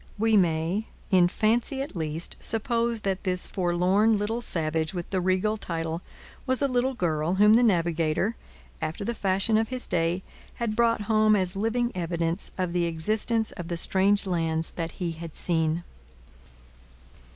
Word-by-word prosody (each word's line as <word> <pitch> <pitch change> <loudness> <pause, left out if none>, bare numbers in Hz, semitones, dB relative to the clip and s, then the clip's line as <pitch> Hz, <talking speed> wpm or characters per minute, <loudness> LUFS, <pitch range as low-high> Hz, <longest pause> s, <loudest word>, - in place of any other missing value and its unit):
We 220 +1 +2
may, 175 +3 +1 0.2
in 180 -2 +5
fancy 235 +8 +1
at 280 - -9
least, 160 0 -3
suppose 230 0 0
that 195 -2 -2
this 180 -2 -1
forlorn 185 +4 +2
little 220 +4 -2
savage 160 -4 -1
with 175 -1 -5
the 190 -2 0
regal 185 +4 +1
title 165 -3 -4 0.5
was 260 0 +2
a 280 - +2
little 255 0 0
girl 165 -2 0
whom 210 +2 +6
the 235 - +6
navigator, 170 -1 +1 0.5
after 160 +6 -3
the 235 - -1
fashion 200 +1 +1
of 220 - 0
his 255 +1 -2
day, 170 +2 0 0.3
had 230 -3 -2
brought 230 -1 +2
home 215 0 +3
as 185 -1 0
living 230 +4 0
evidence 170 0 -2
of 180 -2 -2
the 175 -1 +1
existence 215 +7 +1
of 175 - -7
the 170 -1 -3
strange 195 +4 +2
lands 165 -3 -1
that 165 -1 -5
he 175 -3 -3
had 165 -1 -9
seen. 165 -1 +1
190 Hz, 160 wpm, -26 LUFS, 170-220 Hz, 0.5 s, whom